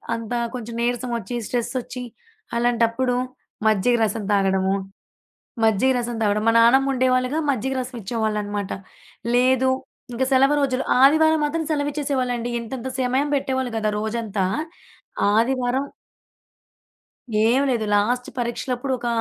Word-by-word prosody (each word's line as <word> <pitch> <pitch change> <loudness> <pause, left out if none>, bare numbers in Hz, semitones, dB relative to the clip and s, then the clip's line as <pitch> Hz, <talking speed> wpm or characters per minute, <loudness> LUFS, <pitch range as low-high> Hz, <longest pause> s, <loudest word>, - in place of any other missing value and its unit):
అంత 230 +1 -5 0.2
కొంచెం 235 -1 -6
నీరసం 245 +1 -1
ఒచ్చి, 240 +4 -5
స్ట్రెస్ 240 0 -2
ఒచ్చి, 250 +1 -7 0.5
అలాంటప్పుడు 240 +1 +1 0.5
మజ్జిగ 215 +3 +3
రసం 215 +1 -1
తాగడము. 190 -1 +2 0.9
మజ్జిగ 220 +4 +3
రసం 240 -1 -3
తగడం. 210 0 +1
మా 230 - +5
నాన్నమ్మ 265 +4 +5
ఉండేవాళ్ళుగా. 255 +2 +1
మజ్జిగ 265 0 -1
రసం 255 +1 -6
ఇచ్చేవాళ్ళనమాట. 210 -2 -2 0.6
లేదు 260 +1 +3 0.4
ఇంక 255 +2 0
సెలవు 270 +2 +5
రోజులు, 265 -2 0 0.2
ఆదివారం 315 +3 +5
మాత్రం 320 +2 -1
సెలవిచ్చేసేవాళ్ళండి. 275 -5 -1
ఇంతంత 235 +2 -6
సమయం 260 +3 +1
పెట్టేవాళ్ళు 260 -2 -1
గద 215 -1 0
రోజంతా. 220 -3 -2 0.9
ఆదివారం 255 +3 +1 1.6
ఏం 245 +4 +4
లేదు. 235 -4 0
లాస్ట్ 245 +5 +1
పరీక్షలప్పుడు 245 +2 -2
ఒక 240 - -4
245 Hz, 115 wpm, -22 LUFS, 225-260 Hz, 1.6 s, మా